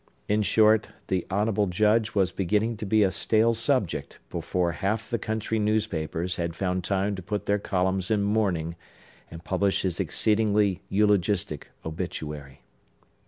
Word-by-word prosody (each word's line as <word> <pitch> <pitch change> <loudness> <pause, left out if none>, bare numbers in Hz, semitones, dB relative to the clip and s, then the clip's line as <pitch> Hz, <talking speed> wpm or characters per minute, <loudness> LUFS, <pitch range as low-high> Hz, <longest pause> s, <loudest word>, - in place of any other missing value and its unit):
In 105 +1 +2
short, 110 +1 +4 0.2
the 90 -2 -1
honorable 105 +1 +1
Judge 110 +4 +2
was 95 -2 +2
beginning 105 +5 0
to 105 -1 -5
be 110 +1 +4
a 95 - +2
stale 115 +3 +2
subject 115 - -1
before 90 -2 -1
half 105 +6 -2
the 120 -2 -2
country 110 0 -2
newspapers 90 -5 -1
had 85 -1 -2
found 90 0 -1
time 100 +2 0
to - - -6
put 105 +3 -4
their 105 0 +1
columns 95 -1 0
in 105 -2 +2
mourning, 95 -6 0 0.5
and 85 0 -10
publish 95 +2 0
his 90 -3 -2
exceedingly 105 -3 +2
eulogistic 105 -1 +1 0.2
obituary. 75 -4 -6
100 Hz, 145 wpm, -26 LUFS, 90-110 Hz, 0.5 s, short